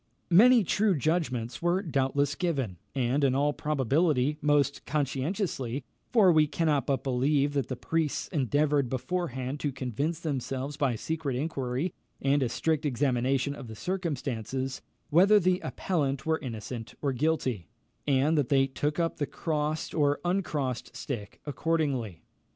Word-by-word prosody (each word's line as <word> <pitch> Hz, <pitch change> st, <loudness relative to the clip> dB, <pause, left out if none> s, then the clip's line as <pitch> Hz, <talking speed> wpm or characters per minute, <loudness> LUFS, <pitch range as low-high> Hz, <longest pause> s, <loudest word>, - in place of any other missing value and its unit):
Many 235 Hz, +6 st, +7 dB
true 200 Hz, +2 st, +2 dB
judgments 130 Hz, -6 st, -1 dB
were 175 Hz, +3 st, +1 dB
doubtless 140 Hz, -3 st, +1 dB
given, 135 Hz, -, -2 dB, 0.2 s
and, 130 Hz, +2 st, +1 dB
in 130 Hz, -2 st, +3 dB
all 145 Hz, +2 st, +2 dB
probability, 150 Hz, 0 st, +1 dB
most 145 Hz, -2 st, +2 dB
conscientiously; 140 Hz, -, -1 dB, 0.3 s
for 210 Hz, -7 st, +6 dB
we 155 Hz, -2 st, +4 dB
cannot 150 Hz, -2 st, 0 dB
but 135 Hz, -1 st, 0 dB
believe 140 Hz, +2 st, +1 dB
that 140 Hz, -4 st, 0 dB
the 130 Hz, -, -3 dB
priests 160 Hz, +3 st, -1 dB
endeavoured 145 Hz, -2 st, +1 dB
beforehand 130 Hz, -1 st, -3 dB
to 145 Hz, -, -1 dB
convince 135 Hz, +5 st, -2 dB
themselves 135 Hz, -2 st, -3 dB
by 140 Hz, -5 st, +1 dB
secret 155 Hz, +2 st, -3 dB
inquiry 135 Hz, +2 st, -2 dB, 0.3 s
and 140 Hz, +1 st, +2 dB
a 125 Hz, -, +1 dB
strict 155 Hz, +5 st, 0 dB
examination 135 Hz, 0 st, +1 dB
of 140 Hz, -3 st, -9 dB
the 110 Hz, -, -8 dB
circumstances, 135 Hz, -, -3 dB, 0.3 s
whether 195 Hz, +7 st, +6 dB
the 185 Hz, -1 st, +2 dB
appellant 140 Hz, -10 st, -2 dB
were 160 Hz, 0 st, +1 dB
innocent 115 Hz, -3 st, -6 dB
or 140 Hz, -2 st, +1 dB
guilty, 130 Hz, -, 0 dB, 0.4 s
and 140 Hz, +3 st, +3 dB
that 140 Hz, -, 0 dB
they 135 Hz, -2 st, +4 dB
took 145 Hz, +4 st, -2 dB
up 165 Hz, -1 st, 0 dB
the 145 Hz, -, -1 dB
crossed 155 Hz, -1 st, -2 dB
or 145 Hz, -2 st, +2 dB
uncrossed 155 Hz, -9 st, -1 dB
stick 115 Hz, -8 st, -6 dB
accordingly. 140 Hz, -, -1 dB
145 Hz, 140 wpm, -28 LUFS, 130-160 Hz, 0.4 s, Many